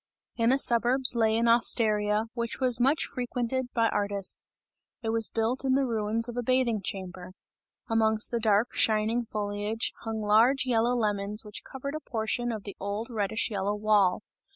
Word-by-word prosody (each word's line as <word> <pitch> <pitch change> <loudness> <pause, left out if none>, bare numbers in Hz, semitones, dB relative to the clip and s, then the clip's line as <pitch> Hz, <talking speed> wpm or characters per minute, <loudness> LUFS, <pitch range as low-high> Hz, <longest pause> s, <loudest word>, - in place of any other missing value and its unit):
In 230 0 +1
the 265 - +4
suburbs, 250 +1 +3
lay 225 -2 +2
an 235 +1 +1
osteria, 215 -2 +2
which 235 -1 -4
was 250 -2 +3
much 275 +5 +2
frequented 250 +1 -3
by 230 -1 +2
artists; 200 -1 -2 0.4
it 225 - -2
was 225 -1 +3
built 230 +4 -1
in 265 -1 +2
the 275 0 +2
ruins 225 -1 -1
of 240 - -7
a 245 - -1
bathing 245 -3 +1
chamber. 185 -2 -7 0.5
Amongst 220 -1 +2
the 235 - -1
dark 215 +1 +2
shining 220 +2 +1
foliage, 210 +2 -3
hung 225 -1 -5
large 230 +7 +3
yellow 240 0 +1
lemons 210 -1 0
which 210 - -8
covered 280 +2 -7
a 310 - -4
portion 240 -2 -3
of 215 -3 -5
the 200 - -8
old 205 +4 -4
reddish 220 0 -2
yellow 200 0 -1
wall. 210 -3 +2
225 Hz, 170 wpm, -27 LUFS, 210-245 Hz, 0.5 s, the